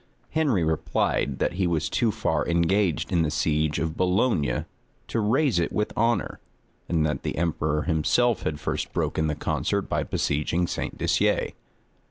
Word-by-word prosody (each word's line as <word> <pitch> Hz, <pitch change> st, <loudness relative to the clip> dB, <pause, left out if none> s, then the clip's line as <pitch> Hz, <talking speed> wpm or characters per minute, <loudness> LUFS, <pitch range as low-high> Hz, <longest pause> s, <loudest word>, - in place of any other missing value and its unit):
Henry 145 Hz, -, +2 dB
replied, 80 Hz, 0 st, 0 dB
that -, -, 0 dB
he 90 Hz, 0 st, 0 dB
was 80 Hz, -2 st, 0 dB
too 115 Hz, +1 st, +1 dB
far -, -, 0 dB
engaged 85 Hz, 0 st, +1 dB
in 85 Hz, -, +3 dB
the 80 Hz, -, +1 dB
siege 75 Hz, 0 st, 0 dB
of 80 Hz, +2 st, -2 dB
Boulogne 90 Hz, -, +1 dB, 0.4 s
to 115 Hz, -, -1 dB
raise 115 Hz, -, +2 dB
it 85 Hz, -, 0 dB
with 105 Hz, -, -1 dB
honor, 115 Hz, -2 st, 0 dB, 0.5 s
and 80 Hz, -3 st, +2 dB
that 75 Hz, -, -1 dB
the -, -, -4 dB
emperor 75 Hz, -2 st, 0 dB
himself 95 Hz, +9 st, +2 dB
had 75 Hz, -1 st, -3 dB
first -, -, -3 dB
broken 80 Hz, -, 0 dB
the 75 Hz, -, -1 dB
concert -, -, -1 dB
by -, -, -1 dB
besieging 75 Hz, +4 st, 0 dB
St. -, -, -4 dB
Disier. -, -, +1 dB
85 Hz, 160 wpm, -25 LUFS, 80-105 Hz, 0.5 s, in